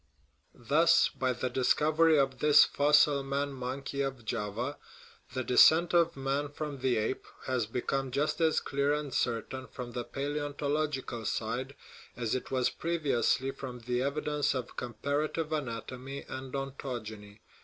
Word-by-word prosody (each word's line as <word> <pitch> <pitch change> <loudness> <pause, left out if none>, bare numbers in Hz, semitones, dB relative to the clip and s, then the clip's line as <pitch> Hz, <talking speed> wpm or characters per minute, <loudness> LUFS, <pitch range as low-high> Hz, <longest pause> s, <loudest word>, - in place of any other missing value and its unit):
Thus, 150 +7 +4
by 130 -1 -1
the 125 +1 -2
discovery 155 +6 +3
of 135 -2 +1
this 150 0 +7
fossil 145 0 +4
man 140 +1 -2
monkey 135 +2 -4
of 135 -4 -3
Java 115 +5 -3 0.6
the 130 - -1
descent 160 +8 +6
of 170 -3 +3
man 135 +2 -1
from 145 -1 -5
the 130 -2 +1
ape 110 +4 -2 0.2
has 125 -4 0
become 135 +3 -2
just 145 +6 -1
as 160 -1 +3
clear 140 +1 0
and 150 -3 -4
certain 125 +2 -2
from 120 +1 -7
the 120 +1 -3
palaeontological 145 -3 -2
side 125 +5 -3 0.4
as 115 -3 -1
it 130 - -3
was 130 -2 +1
previously 140 -5 0
from 130 -3 -8
the 125 +1 -1
evidence 145 +1 0
of 125 -2 -5
comparative 145 +6 -2
anatomy 130 0 -5
and 130 0 -6
ontogeny. 115 -7 -6
135 Hz, 140 wpm, -30 LUFS, 125-145 Hz, 0.6 s, this